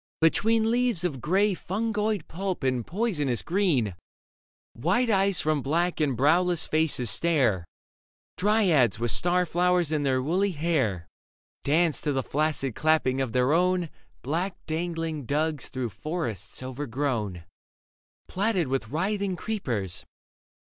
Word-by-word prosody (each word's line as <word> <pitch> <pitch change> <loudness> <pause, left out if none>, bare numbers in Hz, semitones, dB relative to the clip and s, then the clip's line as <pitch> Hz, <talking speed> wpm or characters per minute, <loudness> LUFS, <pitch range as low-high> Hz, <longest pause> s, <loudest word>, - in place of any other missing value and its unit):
Between 220 +7 +3
Leaves 240 -7 +2
of 145 -8 -2
grey 195 - +2
fungoid 210 0 -2
pulp 185 -1 -4
and 130 -2 +1
poisonous 160 - -1
green, 165 - +1 0.8
White 245 -1 +1
eyes 195 -2 +3
from 155 -2 +1
black 170 +6 0
and 140 -6 +1
browless 170 +5 +3
faces 155 -8 +1
stare. 120 - +2 0.7
Dryads 180 - +3
with 120 -1 0
star 180 - +2
flowers 175 -1 +1
in 155 -2 +1
their 135 -2 +1
woolly 180 +8 0
hair 135 - 0 0.6
Dance 160 +2 +2
to 150 - -1
the 135 -1 0
flaccid 145 -3 -1
clapping 150 -2 +2
of 130 -4 -2
their 125 +4 +2
own 180 -1 +2 0.3
Black 170 +8 -2
dangling 165 -2 -3
dugs 150 0 -1
through 130 -3 -3
forests 115 - -4
overgrown, 125 - -3 0.8
Platted 190 - 0
with 130 -4 -1
writhing 190 - -1
creepers. 115 - -3
160 Hz, 125 wpm, -27 LUFS, 130-180 Hz, 0.8 s, Between